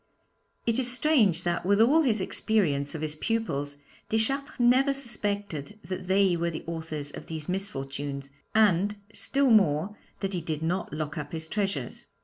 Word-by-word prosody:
It 230 +1 +2
is 250 -1 +2
strange 235 - +3
that, 175 0 -1
with 200 +3 +3
all 275 +9 +6
his 225 -9 +2
experience 160 -9 0
of 155 - -5
his 155 -1 -1
pupils, 150 -7 -2 0.3
Deschartres 270 +7 -1
never 260 +3 +4
suspected 205 - -1
that 185 +1 -5
they 190 -1 +4
were 170 0 0
the 160 - -6
authors 160 -3 -5
of - - -9
these 160 -2 -5
misfortunes, 140 -7 -4 0.2
and, 205 -1 +4 0.2
still 275 -2 +2
more, 195 -2 +3 0.3
that 195 -1 -2
he 175 - -2
did 160 -1 -3
not 175 +3 -1
lock 155 +1 -4
up 145 +1 -7
his 160 -1 -4
treasures. 200 +1 -3
190 Hz, 160 wpm, -28 LUFS, 155-220 Hz, 0.3 s, all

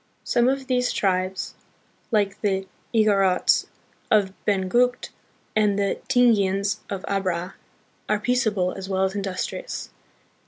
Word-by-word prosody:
Some 240 +1 +2
of 270 0 -1
these 250 -1 +1
tribes, 185 -1 -1 0.6
like 205 -4 0
the 195 -2 0 0.3
Igorots 200 -5 +3 0.4
of 200 -4 +3
Benguet 215 +6 +1 0.5
and 210 -2 +3
the 200 -1 0
Tingians 210 -5 +3
of 195 -2 -4
Abra, 185 -2 -1 0.6
are 215 - +2
peaceable 210 -6 +1
as 190 0 -7
well 190 0 +1
as 190 0 0
industrious. 200 - -4
200 Hz, 115 wpm, -24 LUFS, 190-230 Hz, 0.6 s, Igorots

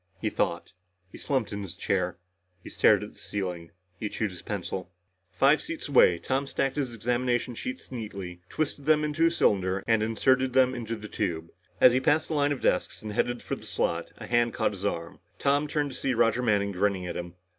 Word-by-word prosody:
He - - -1
thought. - - -1 0.4
He - - -10
slumped 130 -8 -1
in 100 - -4
his 95 -4 -7
chair. 90 -2 -1 0.5
He - - -9
stared - - +4
at - - -8
the - - -19
ceiling. 90 -4 -4 0.3
He 105 - -2
chewed 110 -1 -2
his 90 - -9
pencil.... 95 -2 -4 0.4
Five 135 +11 +4
seats 330 - -5
away, 110 -10 +6
Tom 135 +9 -1
stacked 135 -1 -1
his 140 -4 -1
examination 120 +2 0
sheets 255 - -6
neatly, 100 -7 -6
twisted 145 -2 -3
them 155 -1 +5
into 150 +2 +2
a - - +2
cylinder 95 - +1
and 115 -2 +3
inserted 130 +4 +2
them 130 0 +4
in 120 -2 -5
the 110 -1 -5
tube. 85 -7 -3 0.3
As 125 - +7
he 130 - +3
passed 150 +4 +2
the - - -1
line 145 -1 +2
of 140 - -2
desks 90 - 0
and 105 -1 -5
headed 120 +2 0
for - - -3
the - - -12
slot, - - -1
a - - -8
hand 120 -1 +2
caught - - +1
his 100 0 -3
arm. 85 -3 -4 0.2
Tom 145 +2 +2
turned 145 -1 -1
to - - -8
see 130 -2 0
Roger 115 +1 +3
Manning 100 -4 +2
grinning 95 -1 0
at 90 - -4
him. 85 0 -6
115 Hz, 210 wpm, -28 LUFS, 100-135 Hz, 0.5 s, As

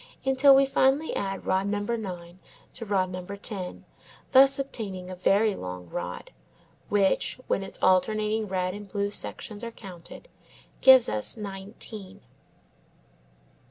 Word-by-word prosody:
until 270 +1 +6
we 275 0 +5
finally 270 +3 +2
add 195 -1 -3
rod 190 +1 +1
number 205 +3 -1
9 180 -5 -7 0.3
to 230 - -7
rod 190 -2 +1
number 185 +2 -6
10, 195 -3 -6 0.5
thus 270 +1 +7
obtaining 195 -9 -5
a - - -6
very 200 +4 +3
long 90 - -7
rod, - - -6 0.6
which, 200 -2 +1
when - - 0
its 195 - -6
alternating 215 +3 +2
red 185 -1 -1
and 205 0 -9
blue 200 +1 -2
sections 210 +1 -3
are 235 - -3
counted, 195 - -11 0.5
gives 260 -2 +8
us 105 - -3
nineteen. 200 0 -8
200 Hz, 130 wpm, -27 LUFS, 185-230 Hz, 0.6 s, gives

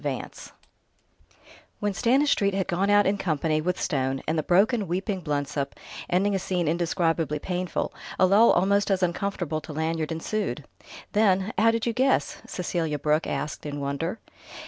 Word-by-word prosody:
XXIII - - 0
AMNESTY - - -9 1.3
When 205 -1 -1
Stanistreet 235 -3 +2
had 195 -1 -1
gone 190 +3 0
out 205 0 +5
in 200 +1 +1
company 155 -2 0
with 180 +3 -1
Stone, 135 -4 -1
and 160 - +1
the 155 - +1
broken, 200 - +2
weeping 190 +3 -2
Blensop, 145 -2 -2 0.3
ending 195 +3 +2
a 195 - +1
scene 180 -3 -1
indescribably 165 -2 0
painful, 180 +3 -3 0.2
a 185 - +5
lull 205 +5 +6
almost 200 +3 +3
as 190 -1 +1
uncomfortable 175 -3 -1
to 155 - -9
Lanyard 160 +1 -2
ensued. 205 +7 -3 0.5
Then 205 -1 +2
"How 220 +3 +4
did 225 0 0
you 235 - 0
guess?" 265 +3 +1
Cecelia 165 -4 -2
Brooke 150 +2 +1
asked 145 +2 -3
in 145 -1 -5
wonder. 140 +8 -2
180 Hz, 160 wpm, -26 LUFS, 155-200 Hz, 1.3 s, lull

